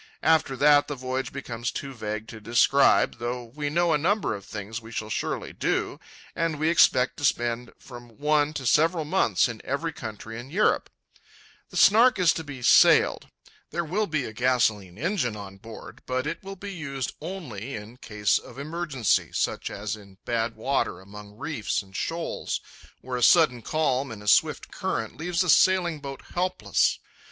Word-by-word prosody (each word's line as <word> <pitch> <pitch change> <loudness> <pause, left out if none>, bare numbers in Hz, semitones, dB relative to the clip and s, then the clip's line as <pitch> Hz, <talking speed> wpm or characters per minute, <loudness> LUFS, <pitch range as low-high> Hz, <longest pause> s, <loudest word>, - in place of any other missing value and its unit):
After 155 -4 +3
that 145 +1 +5
the 145 - -4
voyage 130 +1 -3
becomes 120 -4 -4
too 140 -1 -6
vague 110 -2 -5
to 110 - -10
describe, 120 +3 +3
though 120 +1 -3
we 145 +5 -4
know 170 +2 +2
a 150 - +2
number 200 - +1
of 100 -2 -8
things 110 +3 -6
we 110 +1 -12
shall 110 -1 -4
surely - - -3
do, - - -1 0.4
and 165 -2 -1
we 155 +2 +1
expect 130 -6 +4
to - - -8
spend 120 -2 0
from 120 -3 -13
one 150 0 +2
to 135 -4 -5
several 160 +5 +3
months 150 - +2
in 115 -2 -7
every 160 +4 -2
country 110 -1 -7
in 125 +3 -9
Europe. 200 +8 +1 0.8
The - - -7
Snark 230 +4 +6
is 180 -4 +4
to 160 - -5
be 140 -4 -9
sailed. - - +5 0.4
There 170 0 -2
will 205 +7 -1
be 155 -5 -1
a 110 - -7
gasolene 110 -6 +1
engine 155 - -1
on 100 -2 -9
board, 115 +3 -11
but 130 +1 -1
it 160 +2 -4
will 195 0 -8
be 200 +1 -7
used 140 -7 -4
only 140 - -6
in 110 +3 -9
case 105 -5 0
of - - -14
emergency, 150 - 0
such - - -1
as 105 +1 -4
in 100 -3 -16
bad 115 -1 -1
water 110 -5 -1
among 105 +2 -12
reefs 115 -8 -2
and 95 0 -18
shoals, 165 - -3 0.4
where 125 0 -4
a - - -4
sudden 125 -2 +5
calm 135 -2 0
in 105 -2 -9
a - - -11
swift - - +3
current - - -3
leaves 175 +2 0
a 180 - -3
sailing 175 -4 +4
boat 140 -1 -8
helpless. 185 +1 +1
130 Hz, 180 wpm, -26 LUFS, 115-160 Hz, 0.8 s, Snark